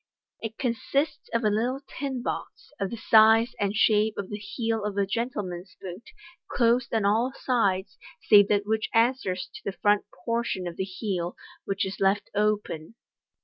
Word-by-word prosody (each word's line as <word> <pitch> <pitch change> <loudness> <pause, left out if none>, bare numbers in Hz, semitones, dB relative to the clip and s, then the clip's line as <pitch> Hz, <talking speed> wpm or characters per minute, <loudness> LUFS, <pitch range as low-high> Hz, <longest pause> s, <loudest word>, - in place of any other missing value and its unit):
It 225 -1 -5
consists 275 +4 -1
of 230 0 0
a 210 - +3
little 245 +6 0
tin 265 -3 -4
box, - - -5
of 195 - -1
the 235 - -5
size 225 +2 +5
and 200 0 0
shape 215 0 +3
of 200 0 -5
the 205 - -4
heel 225 +2 -2
of 205 -1 -3
a 200 - +3
gentle 230 +2 -2
man's 180 +1 -8
boot, 185 +4 -9 0.4
closed 240 0 +2
on 220 -3 +1
all 230 +6 +2
sides, 195 -6 0 0.2
save 205 -1 +7
that 205 0 +1
which 220 +1 -1
answers 225 -7 +1
to - - -10
the 200 - -4
front 205 -1 +2 0.2
portion 230 -5 -1
of 175 -1 -5
the 190 - -1
heel, 185 -2 -3 0.3
which 195 0 -1
is 190 +1 -6
left 195 +1 +1
open. 210 -4 -1
210 Hz, 175 wpm, -27 LUFS, 195-230 Hz, 0.4 s, save